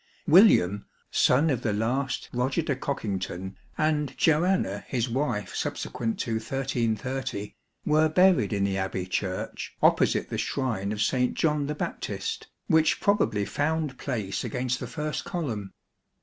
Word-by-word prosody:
William, 125 - +5 0.2
son 145 +5 +4
of 125 -3 -1
the 110 - 0
last 125 +6 -1
Eoger 130 +6 0
de 140 - 0
Cockington 95 -8 -4 0.2
and 150 -3 0
Johanna 160 - +2
his 125 -2 -1
wife 120 -4 -2
subsequent 115 -1 -3
to 115 -1 -1
1330, 125 -2 -2 0.3
were 155 +1 +4
buried 180 - +4
in 100 -2 0
the 100 -1 0
Abbey 95 -1 -2
Church 95 0 -3
opposite - - +3
the - - -3
shrine 110 -7 -1
of 105 - -3
S. 105 - +1 0.2
John 150 -3 +1
the 150 - -2
Baptist, - - -4 0.2
which 160 0 +3
probably 110 - +2
found 150 -1 -1
place 105 -8 -3
against 125 -1 -2
the - - -5
first 150 -1 -3
column. 120 - -4
130 Hz, 135 wpm, -27 LUFS, 105-150 Hz, 0.3 s, William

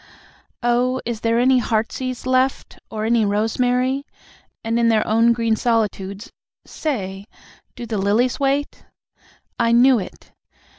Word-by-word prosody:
Oh, 245 +2 +1
is 230 -2 -4
there 230 0 +1
any 255 +1 +4
heartsease 240 +2 -2
left, 255 +1 0
or 215 -1 -4
any 230 0 +2
rosemary? 245 +6 0 0.6
And 225 +1 0
in 230 -1 +3
their 220 -1 +2
own 230 +2 +3
green 230 -1 +1
solitudes, 210 -3 -2 0.3
say, 200 -9 -4 0.5
do 240 - -7
the 220 -3 -3
lilies 215 +6 +1
wait? 280 +1 -1 0.8
I 230 -1 +2
knew 245 +1 +5
it! 190 - -10
235 Hz, 130 wpm, -21 LUFS, 220-255 Hz, 0.8 s, knew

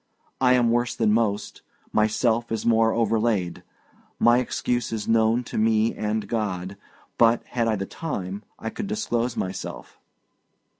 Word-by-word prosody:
I 125 -1 +5
am 120 -2 +3
worse 120 +1 0
than 110 -2 +2
most; 105 -2 -1 0.3
myself 115 +2 +1
is 115 - -2
more 115 -1 +4
overlaid; 110 -6 0 0.6
my 120 +1 +5
excuse 125 -1 -1
is 110 -2 -3
known 115 +2 +3
to 115 - -4
me 110 0 +2
and 105 -1 -2
God. 100 -4 -3 0.4
But, 115 0 +4
had 115 -2 -1
I 110 - +2
the 95 -1 -3
time, 100 - -5 0.2
I 115 - -5
could 215 - -5
disclose 125 - -1
myself." 95 0 -5
115 Hz, 145 wpm, -24 LUFS, 105-120 Hz, 0.6 s, I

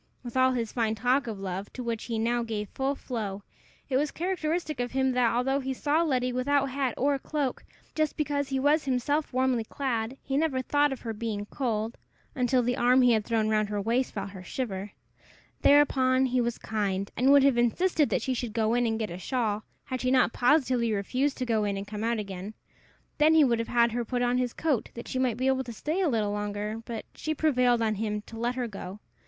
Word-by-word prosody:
With 240 -1 -8
all 260 0 +4
his 230 -3 -2
fine 225 -2 0
talk 250 +3 +1
of 215 -3 -5
love, 195 +1 -5
to 255 - -5
which 230 -2 -3
he 230 -2 -3
now 235 +2 +1
gave 215 -3 -4
full 270 +1 -1
flow, 205 -7 -5 0.4
it 260 - +1
was 295 +2 +1
characteristic 330 -3 -2
of 245 0 -2
him 265 0 +2
that, 250 -2 +2
although 270 +3 +1
he 265 -1 -3
saw 295 +5 +1
Letty 255 -6 0
without 275 +2 +2
hat 265 -3 -1
or 280 +1 +1
cloak, 285 -2 -2 0.3
just 310 -1 0
because 285 -2 -1
he 270 -1 0
was 295 +3 +3
himself 275 +4 0
warmly 255 -2 +1
clad, 240 0 -3
he 270 0 -1
never 285 -4 +1
thought 290 +2 +2
of 265 - -5
her 225 -2 -4
being 210 -2 -3
cold, 225 -1 -3 0.3
until 250 -1 +2
the 245 +2 0
arm 250 +1 +4
he 250 - +5
had 220 -2 +2
thrown 220 -1 0
round 215 -1 +1
her 205 -1 -2
waist 235 +5 0
felt 200 -1 -4
her 190 -2 -9
shiver. 200 -2 -4 0.7
Thereupon 265 -2 +4
he 255 -1 +1
was 235 0 -1
kind, 200 -2 -2
and 260 +3 +4
would 280 -1 +7
have 270 -3 +4
insisted 300 +6 +2
that - - 0
she 260 - 0
should 240 -3 -4
go 225 -1 +1
in 245 0 +2
and 225 -1 0
get 220 -4 -3
a 175 - -6
shawl, 215 -2 -1 0.2
had 255 -1 -4
she 255 - +1
not 255 -2 +3
positively 250 -3 +2
refused 250 +8 0
to 255 - -2
go 225 -3 +1
in 200 -1 -1
and 195 - -5
come 210 +1 -5
out 235 0 +1
again. 200 0 -6 0.6
Then 310 +2 +5
he 315 - +7
would 235 -4 +2
have 230 - -2
had 235 -1 +3
her 240 +1 -1
put 245 +1 -1
on 245 +1 +2
his 250 -1 0
coat, 295 -8 -1
that 235 - -7
she 255 - -2
might 250 -4 +1
be 255 - -1
able 265 0 +2
to 240 - -7
stay 310 - -2
a 355 - +2
little 215 -5 0
longer; 210 +1 -3
but 230 -2 -5
she 310 0 -3
prevailed 250 -6 +2
on 220 -1 +1
him 210 0 -3
to 225 +1 -10
let 240 +2 -1
her 250 -2 -2
go. 195 -2 -8
245 Hz, 230 wpm, -28 LUFS, 220-270 Hz, 0.7 s, would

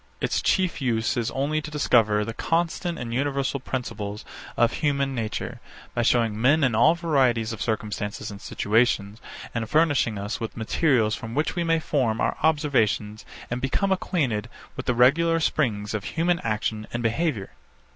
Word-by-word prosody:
Its - - 0
chief 185 -5 +1
use 120 -1 0
is 120 -3 -1
only 145 +3 -1
to 155 - -7
discover 110 -8 +2
the 115 - -5
constant 170 +4 -1
and 115 -2 -5
universal 140 +1 -1
principles 110 -5 -5 0.3
of 120 0 +3
human 140 -2 0
nature, 115 -4 -4 0.3
by 120 - 0
showing 115 -2 +2
men 145 +5 +4
in 130 -3 +3
all 120 +9 +5
varieties 130 -9 +1
of 110 - -8
circumstances 105 -2 -3
and 100 0 -10
situations, 110 -1 0 0.3
and 115 -1 -3
furnishing 145 -9 +2
us 100 +2 -4
with 115 -1 -5
materials 115 -1 +2
from 115 +1 -5
which 150 +2 0
we 175 - 0
may 165 -1 +2
form 125 -8 0
our - - +1
observations 130 -9 +1 0.3
and 120 +1 -2
become 195 +9 0
acquainted 130 - -1 0.3
with 130 - -6
the 125 - +2
regular 165 +7 +4
springs 110 -10 0
of 105 -2 -2
human 170 +7 0
action 110 -1 -2
and 120 0 -3
behaviour. 115 -3 -1
125 Hz, 165 wpm, -25 LUFS, 110-150 Hz, 0.3 s, all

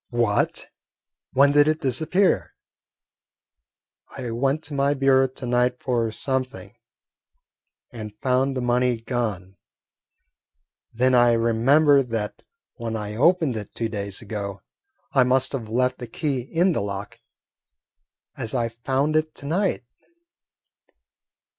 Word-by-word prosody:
"What? 120 -4 0 0.7
When 140 +2 +5
did 145 +1 +5
it 155 0 +1
disappear?" 160 +7 +1 1.6
"I 125 -3 -4
went 135 +6 0
to 145 - -6
my 140 +1 +1
bureau 135 -1 +4
to 130 0 -9
night 125 +1 +1
for 120 -3 0
something 130 +3 -4 1.2
and 110 -4 -7
found 130 +5 0
the - - -1
money 125 -1 +1
gone; 105 -6 -4 1.3
then 130 +3 +2
I 120 -1 +5
remembered 130 +5 +3
that 110 -2 -3 0.4
when 115 -2 -4
I 105 -1 -5
opened 160 0 +3
it 105 -2 -7
two 115 -1 -2
days 100 -1 -4
ago 100 -2 -6 0.5
I 135 - +4
must 130 +1 +2
have 120 -6 -5
left 125 +2 0
the 120 - -6
key 140 +3 -2
in 165 +9 +1
the 160 - -1
lock, 100 0 -6 1.2
as 115 +3 -4
I 120 -2 0
found 135 +6 -1
it 155 0 0
to - - -11
night." 175 -2 0
125 Hz, 125 wpm, -24 LUFS, 115-140 Hz, 1.6 s, When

